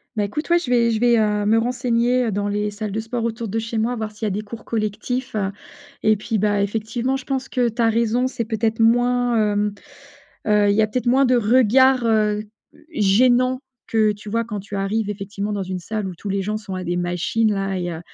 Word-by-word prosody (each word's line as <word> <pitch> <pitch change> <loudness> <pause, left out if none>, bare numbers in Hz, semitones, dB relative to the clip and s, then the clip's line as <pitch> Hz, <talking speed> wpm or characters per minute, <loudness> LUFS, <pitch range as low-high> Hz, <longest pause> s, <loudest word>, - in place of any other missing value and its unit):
Bah, 210 - 0
écoute, 300 +12 -4
ouais, 345 - +5
je 340 -8 -4
vais 235 -1 +4
je 220 - 0
vais, 240 -1 +4
heu, 210 -1 +1
me 220 +2 +4
renseigner 245 -1 +1
dans 205 +1 -1
les 210 0 -1
salles 210 0 -5
de 215 - -2
sport 230 +1 -3
autour 230 0 -3
de 225 +3 -2
chez 225 0 -4
moi, 235 +3 0
voir 220 -1 -4
s'il 215 +1 -6
y - - +1
a - - -1
des 205 +3 -2
cours 220 +2 -10
collectifs, 225 +3 -3
heu, 195 -2 -1 0.5
et 215 0 +4
puis, 220 +1 -2
bah, 205 0 +2
effectivement, 225 +5 -2
je 265 - -6
pense 265 -1 -2
que 245 -2 +1
tu 235 +2 -13
as 230 - +4
raison, 230 +2 +1
c'est 235 -3 -3
peut-être 220 0 -1
moins, 245 +1 +3 0.2
hem, 205 0 0 0.7
heu, 210 -1 +4
il 200 - +3
y 220 - +3
a 215 - +3
peut-être 250 +4 -3
moins 265 +3 +4
de 250 0 +3
regards, 250 +2 +4
heu, 210 -2 +2 0.5
gênants 250 +3 +3 0.3
que 215 -2 +2
tu 205 0 -10
vois 230 +1 0
quand 210 -4 -5
tu 205 +1 -8
arrives 205 +2 -1
effectivement 205 0 -4
dans 200 -2 -2
une 185 0 -4
salle 210 +2 -4
où 180 - -7
tous 200 - -7
les 195 0 0
gens 210 +2 -2
sont 205 -3 -6
à 185 -1 -5
des 175 +1 -1
machines 180 +5 0
là 195 -1 -2
et 175 -1 -3
heu, 160 - -6
220 Hz, 240 wpm, -21 LUFS, 205-240 Hz, 0.7 s, ouais